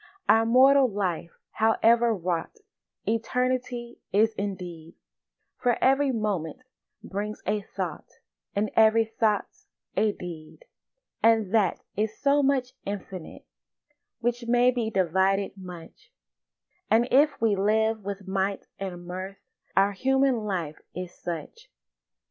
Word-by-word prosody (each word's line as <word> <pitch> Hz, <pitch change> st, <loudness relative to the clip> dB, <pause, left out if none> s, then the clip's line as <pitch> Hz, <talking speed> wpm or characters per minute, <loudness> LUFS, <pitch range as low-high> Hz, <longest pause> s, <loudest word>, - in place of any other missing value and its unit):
Our 225 Hz, +1 st, +5 dB
mortal 265 Hz, +2 st, +6 dB
life, 185 Hz, -5 st, -2 dB, 0.2 s
however 230 Hz, +1 st, +3 dB
wrought, 180 Hz, -, -2 dB, 0.5 s
Eternity 245 Hz, +1 st, -1 dB
is 220 Hz, +2 st, +3 dB
indeed; 180 Hz, -5 st, -6 dB, 0.6 s
For 245 Hz, -2 st, +2 dB
every 270 Hz, +1 st, +3 dB
moment 210 Hz, -2 st, -2 dB, 0.4 s
brings 210 Hz, +2 st, -5 dB
a 210 Hz, +1 st, 0 dB
thought, 185 Hz, -5 st, -6 dB, 0.4 s
And 205 Hz, 0 st, 0 dB
every 225 Hz, 0 st, +5 dB
thought's 220 Hz, -2 st, -1 dB, 0.3 s
a 210 Hz, +2 st, +3 dB
deed; 175 Hz, -, -10 dB, 0.6 s
And 225 Hz, -3 st, +3 dB
that 210 Hz, -6 st, +2 dB
is 215 Hz, +2 st, -1 dB
so 285 Hz, +1 st, +3 dB
much 270 Hz, -2 st, +1 dB
infinite 195 Hz, -3 st, -7 dB, 0.8 s
Which 240 Hz, 0 st, -1 dB
may 245 Hz, +1 st, +4 dB
be 235 Hz, -3 st, -1 dB
divided 190 Hz, +1 st, +1 dB
much; 180 Hz, -3 st, -11 dB, 0.8 s
And 230 Hz, +3 st, +4 dB
if 285 Hz, +2 st, +4 dB
we 220 Hz, -2 st, +2 dB
live 220 Hz, +2 st, +1 dB
with 200 Hz, 0 st, -6 dB
might 195 Hz, +1 st, -1 dB
and 180 Hz, -3 st, -6 dB
mirth 185 Hz, +2 st, -6 dB, 0.4 s
Our 195 Hz, +1 st, +5 dB
human 265 Hz, +5 st, +2 dB
life 170 Hz, -7 st, -3 dB, 0.2 s
is 180 Hz, 0 st, -6 dB
such. 165 Hz, -4 st, -7 dB
210 Hz, 115 wpm, -26 LUFS, 190-235 Hz, 0.8 s, mortal